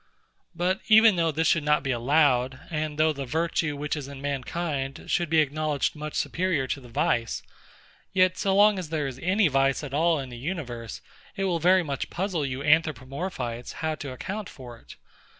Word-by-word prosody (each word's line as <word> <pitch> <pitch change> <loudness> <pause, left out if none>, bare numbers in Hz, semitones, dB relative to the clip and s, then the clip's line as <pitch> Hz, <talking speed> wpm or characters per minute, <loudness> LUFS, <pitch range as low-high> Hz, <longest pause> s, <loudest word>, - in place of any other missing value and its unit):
But 180 +3 0
even 220 -1 +7
though 165 -1 +2
this 160 +2 0
should 165 -2 +3
not 150 -1 +2
be 135 - -1
allowed, 130 0 +2
and 155 -1 -2
though 155 0 +3
the 140 -1 -5
virtue 160 0 -1
which 145 +1 -2
is 145 -3 -6
in 140 -1 -9
mankind 140 +1 -3
should 175 -3 0
be 160 0 +5
acknowledged 150 0 -1
much 150 0 -6
superior 175 -6 0
to 140 - -2
the 125 - -13
vice, 115 0 0 0.7
yet 185 -1 +3
so 195 -1 0
long 205 0 +5
as 175 -4 -6
there 155 -2 -1
is 130 -2 -5
any 185 +3 +3
vice 135 0 +1
at 140 -2 -7
all 165 +2 +3
in 135 -2 -5
the 120 -1 -9
universe, 125 - -5 0.3
it 195 - -2
will 180 -3 0
very 180 +2 +4
much 140 -4 -4
puzzle 180 -4 -2
you 130 +1 -4
Anthropomorphites, 145 -4 -1
how 160 -1 -2
to 145 -3 -6
account 195 +9 -5
for 125 -3 -10
it. - - -14
150 Hz, 190 wpm, -26 LUFS, 135-170 Hz, 0.7 s, even